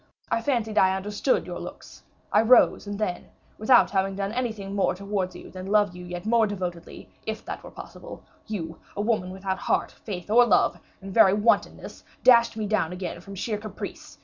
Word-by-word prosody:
I 230 - +1
fancied 225 -5 0
I 190 0 +4
understood 205 +6 0
your - - -6
looks, - - -10 0.3
I - - +6
rose, 230 -2 +5
and 205 0 -4
then, 185 -5 -2 0.3
without 220 +4 +5
having 195 -1 0
done 200 0 -2
anything 220 -5 -3
more 195 -2 +1
towards 200 -1 -3
you - - -11
than 185 0 -8
love 205 -3 +3
you 180 - -9
yet 175 +1 -7
more 225 0 +3
devotedly, 180 -4 -6 0.2
if 220 0 -4
that - - -6
were - - -9
possible - - -11 0.2
you, 165 -7 -5 0.2
a - - 0
woman 210 -4 0
without 190 0 -4
heart, - - 0
faith, 190 -2 -7
or 245 +2 +7
love, - - +3 0.2
in 195 - -7
very 195 -3 +6
wantonness, 210 +2 0 0.2
dashed 235 -2 +6
me 215 - -2
down 205 -6 0
again 180 -2 -5
from 195 +2 -10
sheer 210 +2 -3
caprice. 215 0 -8
205 Hz, 190 wpm, -26 LUFS, 190-220 Hz, 0.3 s, or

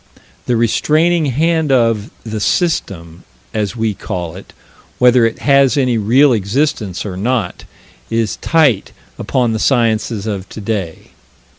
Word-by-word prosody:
The 125 - +1
restraining 155 +8 +2
hand 160 +3 +1
of 115 -4 +1 0.2
the 110 -1 -4
"System" 90 - -2 0.3
as 105 0 -2
we 110 -2 -1
call 90 -3 -5
it, 95 - -12 0.5
whether 125 -1 +5
it 115 - -5
has 140 -1 +4
any 130 -3 +2
real 125 +6 +4
existence 105 - -1
or 95 -3 -5
not 105 -1 -2 0.4
is 115 -2 -1
tight 145 - +1 0.3
upon 120 -3 0
the 110 - -2
sciences 115 -4 0
of 100 -3 -4
today. 100 -6 -5
115 Hz, 130 wpm, -16 LUFS, 105-135 Hz, 0.5 s, whether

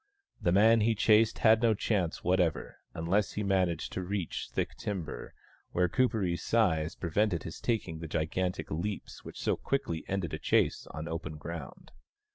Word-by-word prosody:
The 85 - +2
man 110 +4 +6
he 110 +1 +3
chased 110 +1 +4
had 110 0 +5
no 115 -2 +4
chance 95 -5 -1
whatever, 90 -3 0 0.2
unless 95 +5 +1
he 105 - -2
managed 95 -4 0
to - - -2
reach 95 -1 -3
thick - - -2
timber, 95 -7 -5 0.4
where 90 +1 +3
Kuperee's 100 -5 +1
size 85 -9 +1
prevented 90 +1 0
his 80 - -7
taking 105 -9 -1
the 80 - -6
gigantic 85 +4 -2
leaps 95 +6 -4
which - - -9
so - - +1
quickly 135 -13 -2
ended 95 -4 -2
a - - -3
chase - - +1
on 80 +3 -6
open 80 -1 -5
ground. 80 +1 -8
90 Hz, 160 wpm, -30 LUFS, 80-105 Hz, 0.4 s, man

